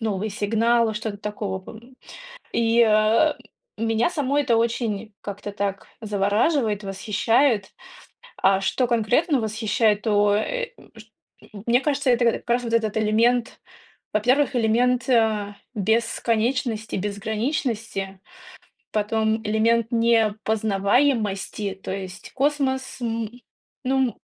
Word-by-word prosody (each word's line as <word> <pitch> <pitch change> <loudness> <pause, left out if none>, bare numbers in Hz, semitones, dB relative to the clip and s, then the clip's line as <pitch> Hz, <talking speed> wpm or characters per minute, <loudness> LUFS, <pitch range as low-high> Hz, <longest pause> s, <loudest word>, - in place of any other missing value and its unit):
новые 215 -1 -2
сигналы, 225 +3 +1
что-то 215 -1 -4
такого 205 -2 -4
пом 230 +6 -13 0.6
и, 230 0 +3
э, 215 +8 +4 0.5
меня 225 +4 +1
само 290 -5 -1
это 255 -6 +2
очень 225 -2 -1
как-то 205 0 -6
так 200 -1 -3
завораживает, 210 +2 +1
восхищает. 210 +3 +1 0.6
А 195 0 +3
что 250 +6 +1
конкретно 245 +6 +2
восхищает, 220 -1 +1
то, 205 -2 +3
э, - - -1 0.3
чт 220 0 -15 0.5
мне 240 +2 +3
кажется, 275 -3 +1
это 240 0 +2
как - - -7
раз 245 +1 +2
вот 230 -1 -4
этот 220 -2 +1
элемент, 230 +3 +1 0.5
во-первых, 255 +6 +2
элемент, 245 +2 +2
э, 215 -4 +2 0.2
бесконечности, 225 +2 0
безграничности, 210 0 -3 0.7
потом 220 +1 0
элемент 220 +2 +2
непознаваемости, 220 -1 +1
то - - -6
есть 190 -1 -8
космос, 265 -2 -1
м, 230 -2 -2 0.5
ну 260 -1 +1
225 Hz, 105 wpm, -23 LUFS, 210-240 Hz, 0.7 s, э